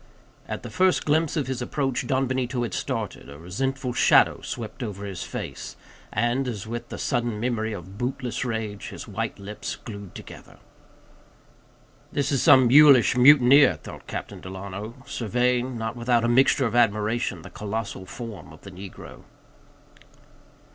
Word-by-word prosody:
At - - -5
the - - -7
first 185 0 +2
glimpse 160 +2 +1
of 145 - 0
his 130 -1 -4
approach, 130 -1 -2
Don 135 +1 +1
Benito 125 -1 -1
had 115 -6 -4
started, - - -4
a 70 - -10
resentful 125 - -3
shadow - - +4
swept 115 +2 -6
over 100 -4 -5
his 95 -3 -6
face; - - -6 0.4
and, 120 +5 0
as 110 -4 -4
with 120 +1 -6
the - - -6
sudden 120 -5 -1
memory 115 -2 -1
of 95 0 -8
bootless 125 -1 -2
rage, 110 -4 -4
his - - -9
white - - -4
lips 100 +2 -6
glued 100 -4 -10
together. - - -11 1.5
This 140 0 -1
is 135 -4 +1
some 130 -2 +7
mulish 140 -2 +7
mutineer, 135 +1 +7
thought - - -11
Captain - - -6
Delano, 100 +4 -7
surveying, 125 +2 0
not 115 +1 -3
without 120 -1 +1
a - - +2
mixture 130 +2 +4
of 115 - -2
admiration, 110 -5 +1
the 100 - -11
colossal 105 -2 -5
form 110 -9 -8
of 80 - -15
the 100 - -11
negro. 95 +1 -10
120 Hz, 155 wpm, -25 LUFS, 105-130 Hz, 1.5 s, some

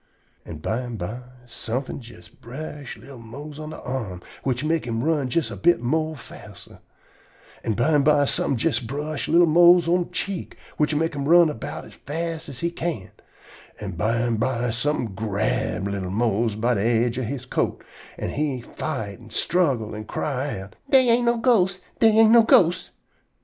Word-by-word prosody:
An' 80 - -7
bimeby 115 0 -3 0.3
somefin' 125 +3 -4
jes 100 -7 -13
brush 140 +2 -8
li'l 135 0 -12
Mose 145 +6 -9
on 155 0 -6
de - - -8
arm, 110 -9 -5 0.2
which 130 0 -1
mek 160 -3 0
him 115 0 -2
run 150 -4 +1
jest 165 +5 0
a - - -5
bit 175 -3 +3
more 155 +6 -1
faster. 115 - -13 0.8
An' 110 - 0
bimeby 145 +3 +3
somefin' 135 - +1
jes 120 0 +1
brush 145 +5 -4
li'l 170 +2 +5
Mose 170 +1 +6
on 175 +1 +2
de - - -17
cheek, 195 -3 -4 0.2
which 150 0 +1
mek 165 +2 0
him 140 -1 -3
run 170 +1 +6
erbout 115 - -6
as - - -14
fast 165 +1 -5
as 130 -3 -7
he 170 0 0
can. 165 - -4 0.7
An' 100 -2 -5
bimeby 115 +5 0
somefin' 120 -3 -1
grab 100 -1 -1
li'l 100 -2 -3
Mose 110 +1 0
by 120 +3 +1
de 100 - 0
aidge 115 +2 +1
of 125 - -2
he 140 +4 -3
coat, 125 0 -2 0.3
an' - - -3
he 145 -3 -1
fight 120 -4 -5
an' 115 -1 -14
struggle 130 -8 0
an' 110 0 -6
cry 135 -4 -3
out: 95 - -12
"Dey 260 -3 +5
ain't 240 +1 +3
no 235 0 +3
ghosts. 195 -6 +3 0.2
Dey 225 - +6
ain't 225 0 +7
no 235 0 +8
ghosts." 180 -5 +4
135 Hz, 170 wpm, -24 LUFS, 115-160 Hz, 0.8 s, no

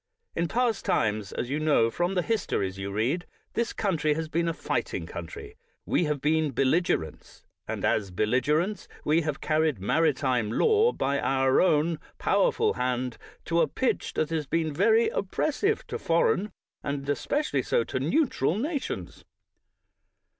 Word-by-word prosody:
In 170 +1 0
past 235 +1 0
times, 105 -2 0
as 125 - -4
you 145 - 0
know 145 -7 +3
from 175 +6 -1
the 180 - +1
histories 100 - -1
you 100 0 -4
read, 125 - -1 0.3
this 235 0 0
country 155 -7 0
has 160 0 -3
been 170 +2 0
a - - +2
fighting - - -2
country; 435 0 -8 0.3
w^e 170 - +2
have 150 -2 -1
been 155 0 +2
bellig 135 +8 +2
erents, 80 -1 -3 0.2
and - - -3
as 100 -3 +1
belligerents, 145 - 0 0.2
we 155 +3 +3
have 150 -3 -3
carried 155 -3 +1
maritime 125 - +1
law 440 - +4
by 140 - -1
your 135 0 +3
own 160 -2 +2 0.2
powerful - - +2
hand, 125 0 -2 0.3
to 170 0 +2
a - - +3
pitch 260 - -1
that 155 +1 0
has 155 -3 -1
been 160 -1 0
very 220 +8 +4
oppressive 310 - -1
to - - -5
foreign, 180 +5 +1 0.3
and 140 -1 -4
especially 285 - 0
so 480 -1 +1
to - - -3
neutral, 235 - +1
nations. 285 +4 -4
155 Hz, 155 wpm, -27 LUFS, 130-195 Hz, 0.3 s, law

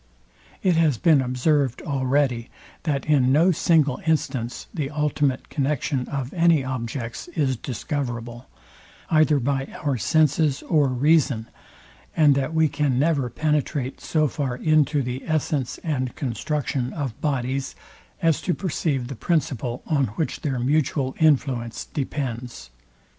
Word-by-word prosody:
It 180 -3 +3
has 155 -7 +3
been 155 +2 +4
observed 130 +1 0
already, 130 -3 0 0.4
that 145 -4 -1
in 135 -4 +3
no 165 +7 +5
single 155 -5 +2
instance 130 -6 -1
the 150 -7 -2
ultimate 150 -3 -1
connexion 140 -2 -1
of 135 -2 -4
any 170 -4 +4
objects 120 -2 -4
is 135 -5 +1
discoverable, 120 -2 -4 0.6
either 155 -2 +4
by 135 +1 -1 0.2
our 140 -4 0
senses 150 - +2
or 150 -5 +3
reason, 135 -3 +2 0.7
and 150 -3 +6
that 135 +2 -1
we 160 -1 +3
can 145 -4 0
never 140 -3 +1
penetrate 145 0 -1
so 155 -2 +1
far 140 -3 -3
into 150 -1 +2
the 125 +2 -4
essence 150 -4 -1
and 130 -6 -2
construction 135 0 -2
of 140 -8 -4
bodies, 135 -2 -1 0.5
as 165 -3 +3
to 180 - 0
perceive 145 -8 -1
the 135 - -5
principle, 130 -3 -1
on 145 -4 +2
which 160 - -2
their 135 -4 -1
mutual 135 +1 0
influence 135 -7 +1
depends. 125 - -5
140 Hz, 130 wpm, -24 LUFS, 125-155 Hz, 0.7 s, and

